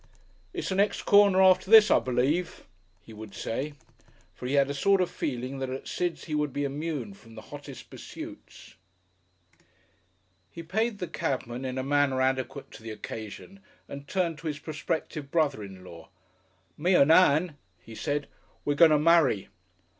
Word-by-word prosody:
"It's - - -4
the - - -1
next 200 +2 +1
corner 200 -2 +5
after 185 0 +4
this, 220 -1 +8
I - - +6
believe," 135 +8 -1 0.4
he 115 - -13
would 110 -1 -10
say. 135 +6 -3 0.6
For 125 - -7
he 135 - 0
had 140 -1 +4
a 140 - -3
sort 195 +7 +3
of 180 - 0
feeling 130 0 -4
that 130 -1 -3
at 130 +1 -6
Sid's 175 -2 -2
he 155 - -6
would 150 -1 0
be 145 +2 -2
immune 140 -6 -4
from 115 +3 -17
the 110 - -9
hottest 145 -3 -10
pursuits. - - -10 1.8
He 170 - -9
paid 220 +6 -1
the 180 - -4
cabman 130 -4 -3
in 130 0 -4
a 130 - -1
manner 140 -1 +1
adequate 130 +1 -1
to - - -12
the 115 - -8
occasion 110 - -8 0.3
and 140 0 -9
turned 170 -5 -1
to 165 - -6
his 150 -2 -3
prospective 155 -1 -4
brother 150 -9 +1
in 95 -2 -11
law. 85 -2 -12 0.7
"Me 180 +4 +3
and 145 -2 +5
Ann," 165 -2 +4 0.2
he 115 +5 -13
said, 145 +4 -2 0.4
"we're 145 - +1
going 160 +3 +6
to 155 - +4
marry." 150 - +3
145 Hz, 170 wpm, -27 LUFS, 130-170 Hz, 1.8 s, this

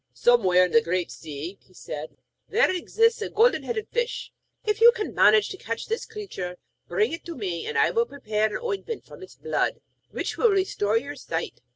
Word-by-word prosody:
'Somewhere 185 -7 +4
in 180 - -4
the 230 - +6
Great 180 -2 -1
Sea,' 160 +5 -7
he 185 - -25
said, 150 -2 -7 0.3
'there 450 +1 +3
exists 455 +6 +2
a - - -2
Golden 460 +4 +3
headed 440 -3 -3
Fish. 480 0 -2 0.3
If 425 +1 0
you 470 +1 +10
can 435 -3 -4
manage 215 0 +5
to 380 - -6
catch 230 -9 -4
this 450 +1 -3
creature, 385 - -6 0.3
bring 430 +1 +1
it 330 - -5
to 340 -1 -6
me, 185 -8 -4
and 455 - -2
I - - +4
will 465 0 +1
prepare 215 -6 -1
an 220 - -5
ointment 455 0 -4
from - - -13
its 380 - -11
blood 465 - -1 0.3
which - - -4
will 465 - +5
restore 370 - +1
your 280 +5 -4
sight. - - -5
330 Hz, 200 wpm, -25 LUFS, -, 0.3 s, you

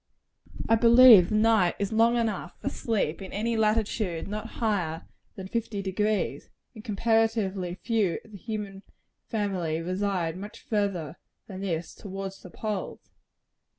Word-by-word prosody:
I - - +3
believe 230 -4 +8
the 215 - 0
night 215 -5 +3
is 200 +2 -2
long 230 +2 +4
enough 215 -6 -2
for - - -2
sleep 205 -7 -2
in 190 - -8
any 230 +3 -1
latitude 215 -5 0
not 215 +2 -5
higher 180 -8 -1 0.3
than 190 -1 -7
fifty 215 -2 -3
degrees; 210 +2 -1 0.2
and 215 -3 -11
comparatively 215 -4 0
few 205 -1 0
of 220 - -17
the 205 - -9
human 205 -2 -5 0.5
family 190 -8 -1
reside 180 -1 -2
much 205 +2 -9
farther 195 -7 -2 0.3
than 190 -2 -8
this 170 -4 -3
towards 195 -1 -7
the 180 - -11
poles. 210 +1 -5
205 Hz, 140 wpm, -27 LUFS, 185-220 Hz, 0.5 s, believe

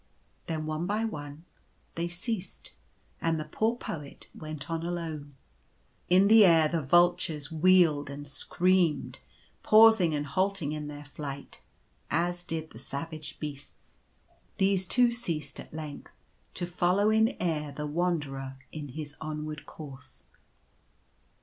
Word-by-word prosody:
Then 155 -1 -2
one 155 +2 -2
by 215 +3 0
one 150 -5 -6 0.5
they 170 +1 -2
ceased, 185 +3 -5 0.5
and 165 -1 +1
the - - -2
poor 220 +9 0
Poet 150 -10 -7
went 155 -3 -7
on 165 -1 -2
alone. 160 -5 -4 0.7
In 185 +3 +6
the 220 0 +8
air 165 -4 +6
the 165 +1 -1
vultures 170 0 +2
wheeled 160 -3 +4
and 145 +1 -7
screamed, 175 +1 +1 0.4
pausing 215 -7 +6
and 145 0 -2
halting 185 0 0
in 150 -1 -4
their 145 0 -8
flight, 140 -1 -7 0.5
as 175 +2 0
did 160 -2 -4
the 110 - -11
savage 145 +2 -6
beasts. 145 - -9 0.6
These 190 -1 +2
too 245 +2 +4
ceased 165 -12 -3
at - - -10
length 155 -2 -7 0.4
to 180 - -2
follow 180 +4 +2
in 220 +3 +3
air 150 -4 -1
the 150 +2 -5
Wanderer 145 -5 -2
in 150 -2 -6
his 145 +2 -7
onward 155 -1 -5
course. 135 - -11
160 Hz, 130 wpm, -29 LUFS, 145-180 Hz, 0.7 s, the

